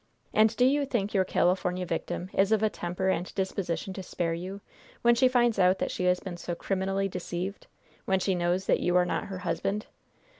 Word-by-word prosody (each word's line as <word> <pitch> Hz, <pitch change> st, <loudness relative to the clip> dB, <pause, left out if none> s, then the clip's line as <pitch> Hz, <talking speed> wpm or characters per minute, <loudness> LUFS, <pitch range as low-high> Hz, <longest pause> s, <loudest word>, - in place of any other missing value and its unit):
And 220 Hz, +1 st, +4 dB
do 250 Hz, -, +5 dB
you 285 Hz, +2 st, +3 dB
think 220 Hz, -6 st, -1 dB
your 190 Hz, -2 st, +3 dB
California 180 Hz, 0 st, +1 dB
victim 175 Hz, +2 st, -3 dB
is 195 Hz, +2 st, +2 dB
of 220 Hz, -1 st, +3 dB
a 215 Hz, -, +2 dB
temper 180 Hz, +2 st, -2 dB
and 180 Hz, -1 st, -1 dB
disposition 190 Hz, -1 st, -2 dB
to 190 Hz, -, -6 dB
spare 170 Hz, -2 st, -2 dB
you, 185 Hz, +4 st, -5 dB, 0.4 s
when 235 Hz, 0 st, +6 dB
she 250 Hz, +2 st, +4 dB
finds 240 Hz, -4 st, +2 dB
out 185 Hz, 0 st, +5 dB
that -, -, -2 dB
she 180 Hz, -, -2 dB
has 180 Hz, 0 st, +3 dB
been 180 Hz, -3 st, -7 dB
so 175 Hz, 0 st, -4 dB
criminally 195 Hz, +2 st, -1 dB
deceived 180 Hz, +1 st, -5 dB, 0.4 s
when 190 Hz, 0 st, +2 dB
she 190 Hz, +1 st, +1 dB
knows 175 Hz, +1 st, 0 dB
that -, -, +3 dB
you 175 Hz, 0 st, +1 dB
are 180 Hz, 0 st, +5 dB
not -, -, -2 dB
her 190 Hz, -, -6 dB
husband? 195 Hz, +3 st, -2 dB
190 Hz, 210 wpm, -28 LUFS, 180-200 Hz, 0.4 s, when